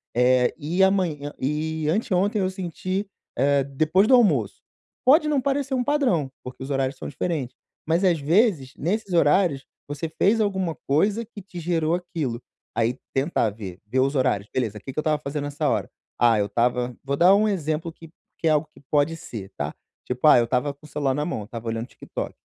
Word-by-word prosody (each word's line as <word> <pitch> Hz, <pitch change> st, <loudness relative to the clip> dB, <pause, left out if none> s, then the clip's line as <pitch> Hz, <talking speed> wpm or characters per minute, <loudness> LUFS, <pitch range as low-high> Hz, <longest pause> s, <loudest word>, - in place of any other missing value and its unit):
eh, 125 Hz, 0 st, +4 dB
e 170 Hz, +5 st, +1 dB
amanhã 170 Hz, -7 st, +1 dB
e 155 Hz, +3 st, -2 dB
anteontem 200 Hz, +2 st, +1 dB
eu 185 Hz, -, +1 dB
senti, 185 Hz, +2 st, -3 dB, 0.3 s
eh, 140 Hz, +1 st, +3 dB
depois 155 Hz, +9 st, +2 dB
do 265 Hz, -, +4 dB
almoço." 155 Hz, -, +2 dB, 0.4 s
Pode 305 Hz, +4 st, +6 dB
não 290 Hz, -3 st, +2 dB
parecer 275 Hz, 0 st, -1 dB
um 255 Hz, -1 st, +1 dB
padrão 245 Hz, -, +1 dB
porque 125 Hz, +1 st, -9 dB
os 135 Hz, -, -7 dB
horários 135 Hz, -1 st, -1 dB
são -, -, -6 dB
diferentes, 145 Hz, -4 st, -3 dB, 0.3 s
mas 165 Hz, +4 st, +2 dB
às 175 Hz, -4 st, +3 dB
vezes 160 Hz, -, +2 dB
nesses 200 Hz, +5 st, -2 dB
horários, 150 Hz, -3 st, +3 dB, 0.2 s
você 145 Hz, +3 st, -4 dB
fez 205 Hz, +7 st, +2 dB
alguma 190 Hz, -5 st, -1 dB
coisa 200 Hz, +11 st, +2 dB
que 210 Hz, -2 st, -11 dB
te 185 Hz, -2 st, -9 dB
gerou 165 Hz, -1 st, 0 dB
aquilo. 160 Hz, -9 st, -4 dB, 0.3 s
Aí 115 Hz, +2 st, +1 dB, 0.2 s
tentar 135 Hz, -5 st, +1 dB
ver 100 Hz, -4 st, -8 dB
ver 125 Hz, +5 st, -1 dB
os 135 Hz, +2 st, +2 dB
horários: 125 Hz, -6 st, +1 dB
"Beleza, 110 Hz, -5 st, -1 dB
que 135 Hz, -, -8 dB
que -, -, -30 dB
eu -, -, +2 dB
estava 155 Hz, -1 st, +1 dB
fazendo 145 Hz, 0 st, -3 dB
nessa 145 Hz, 0 st, -2 dB
hora? -, -, -1 dB, 0.3 s
Ah, 115 Hz, -2 st, +5 dB
eu 100 Hz, -, +2 dB
estava" 120 Hz, +2 st, 0 dB
vou 140 Hz, 0 st, -2 dB
dar 180 Hz, +3 st, +6 dB
um 215 Hz, +2 st, +3 dB
exemplo 165 Hz, -4 st, -1 dB
que 165 Hz, 0 st, -14 dB, 0.3 s
que 165 Hz, -, 0 dB
é -, -, +5 dB
algo 150 Hz, 0 st, +2 dB
que -, -, -17 dB
pode 150 Hz, +2 st, +2 dB
ser, 110 Hz, -11 st, -8 dB
tá? -, -, -3 dB, 0.3 s
Tipo: 125 Hz, +4 st, 0 dB
"Ah 150 Hz, -, +8 dB
eu 120 Hz, -, +2 dB
estava 125 Hz, +4 st, 0 dB
com 145 Hz, +2 st, -19 dB
o -, -, -14 dB
celular 140 Hz, -3 st, 0 dB
na 150 Hz, +1 st, -1 dB
mão, 175 Hz, -, -3 dB
eu -, -, -8 dB
estava 115 Hz, +1 st, -8 dB
olhando 115 Hz, +2 st, -3 dB
TikTok. -, -, -6 dB
150 Hz, 205 wpm, -24 LUFS, 130-185 Hz, 0.4 s, Ah